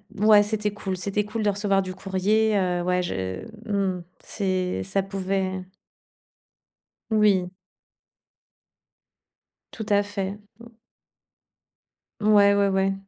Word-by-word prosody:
heu, 210 +1 -1
ouais, 210 -1 +7
c'était 210 0 -1
cool 195 -2 -4
c'était 200 +2 -2
cool 215 +1 -3
de 205 - +3
recevoir 200 -1 +1
du 185 -1 -5
courrier, 205 +3 +1
heu, 180 -2 0
ouais, 180 0 +1
je 95 - -4 0.3
mmh, 190 -3 -1 0.2
c'est 185 -3 -2
ça 195 0 -1
pouvait 195 -1 -2 1.6
Oui. 205 -4 +3 2.2
Tout 220 - -6
à 205 0 +4
fait. 200 -1 -4 0.2
Mmh. 235 - -12 1.5
Ouais, 205 -1 +5
ouais, 200 0 +3
ouais. 195 0 +1
195 Hz, 115 wpm, -25 LUFS, 185-210 Hz, 2.2 s, ouais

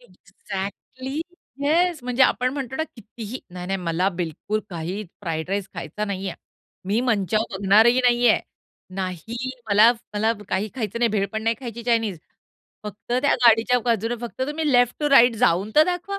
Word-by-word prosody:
Exactly 260 - -7 0.4
yes 340 +3 +2
म्हणजे 250 +1 +1
आपण 255 0 +2
म्हणतो 265 -2 -4
ना 315 - 0
कितीही 225 +2 -8
नाही-नाही 180 +2 -3
मला 175 +2 0
बिलकुल 180 +4 -3
काही 175 +4 -4 0.2
फ्राईड 165 -3 -3
राईस 200 -1 -2
खायचा 190 +7 -4
नाहीये, 195 -3 -4 0.5
मी 205 +5 +1
मंचाऊ 220 -3 +1
बघणारही 210 +5 +4
नाहीये, 245 0 +4 0.6
नाही 195 +7 -4 0.2
मला 210 +3 +7 0.2
मला 220 +2 +2 0.2
काही 195 +3 -1
खायचं 230 -4 -3
नाही, 235 0 +3
भेळ 200 -2 0
पण 220 0 -3
नाही 225 +1 +1
खायची 235 -2 -7
चायनीज. 225 -6 0 0.7
फक्त 210 +3 -7
त्या 285 - +4
गाडीच्या 235 +2 +5
बाजूने 230 -1 0
फक्त 240 +2 -5
तुम्ही 300 0 -1
लेफ्ट 245 -1 +4
टू 295 - +1
राईट 245 -3 +7
जाऊन 190 +1 +2
तर 305 - +8
दाखवा 360 +3 -3
225 Hz, 155 wpm, -23 LUFS, 195-250 Hz, 0.7 s, तर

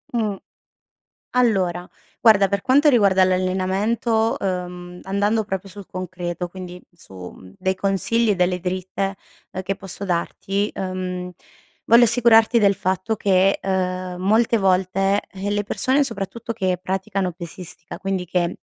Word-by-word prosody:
Mh. 215 -4 0 1.0
Allora 190 -8 +1 0.3
guarda 200 -4 +6
per 200 0 -1
quanto 285 +6 +4
riguarda 200 -7 +4
l'allenamento, 190 +5 +1
uhm, 180 -1 -4
andando 205 +3 0
proprio 195 0 -4
sul 200 +1 -10
concreto 180 -1 -5
quindi 180 0 -9
su, 170 - -18 0.2
mhmm, 95 0 -15
dei 190 - 0
consigli 200 +4 +1
e - - +1
delle 180 0 +1
dritte, 185 +2 -3 0.4
ehm, 185 - -4
che 195 +1 -2
posso 195 +1 -6
darti, 195 +3 -2
mhmm, 185 -1 -4 0.6
voglio 235 +1 +7
assicurarti 235 0 +5
del 200 -2 +4
fatto 190 +4 -1
che, 195 -1 +3
ehm, 185 -1 -2
molte 220 +4 +3
volte, 195 +1 +2
eh, 195 +1 -4
le 205 0 0
persone 260 +7 +1
soprattutto 230 -1 -4
che 190 -5 -1
praticano 190 0 -2
pesistica, 170 -1 -9
quindi 195 -2 -3
che 175 0 -1
190 Hz, 135 wpm, -22 LUFS, 185-210 Hz, 1.0 s, voglio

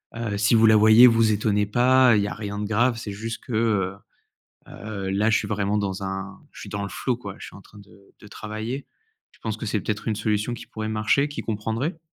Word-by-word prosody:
heu, 115 -3 -3
si 105 +3 +3
vous 110 - +5
la 110 0 +6
voyez, 110 +3 +8
vous 115 -2 +3
étonnez 105 0 +1
pas, 125 +3 +4
il 105 - +2
y - - -1
a - - -4
rien 105 -1 -6
de 105 - -2
grave. 120 +3 +2
C'est 115 -2 -6
juste 110 +3 -6
que, - - -10
heu, 105 -4 0 0.7
heu, 100 -2 -6
là 105 +3 +1
je - - +3
suis 100 - -4
vraiment 105 0 0
dans 100 -1 -3
un 95 0 -5
je - - -12
suis - - -9
dans 100 0 -4
le 100 - -4
flow 125 -3 -2
quoi. 100 -5 -9
Je - - -9
suis - - -12
en 100 - -14
train 105 - -17
de 100 0 -19
de - - -15
travailler». 110 +6 -6 0.5
Tu - - -26
penses 110 -1 -3
que 110 - -5
c'est 105 -1 -1
peut-être 105 +1 -3
une 110 - -1
solution 105 +2 -1
qui - - -9
pourrait 110 0 -5
marcher, 110 +7 +1
qu'ils 145 - -7
comprendraient? 115 - -3
110 Hz, 245 wpm, -24 LUFS, 100-115 Hz, 0.7 s, voyez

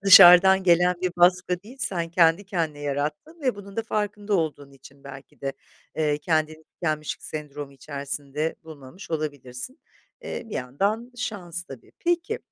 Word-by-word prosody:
dışarıdan 190 0 +9
gelen 180 0 +4
bir 180 -1 -1
baskı 180 +1 +3
değil, 240 +6 -13
sen 175 -6 -1
kendi 170 +2 +4
kendine 165 -6 -2
yarattın 150 - -3
ve 255 -3 +1
bunun 200 -1 -11
da 225 - 0
farkında 210 -1 -2
olduğun 150 -5 -1
için 135 +1 -17
belki 140 0 -12
de, 135 0 -2 0.4
eee, 150 -2 +1
kendini 155 0 -1
tükenmişlik 155 -2 -3
sendromu 145 -2 -6
içerisinde 140 +2 -4
bulmamış 155 +3 -12
olabilirsin. 145 - -5 0.4
Eee, - - -5
bir - - -7
yandan 200 - -1
şans, 185 -9 -4
tabii. 135 -8 -13
Peki, 345 -1 0
165 Hz, 145 wpm, -25 LUFS, 145-195 Hz, 0.4 s, dışarıdan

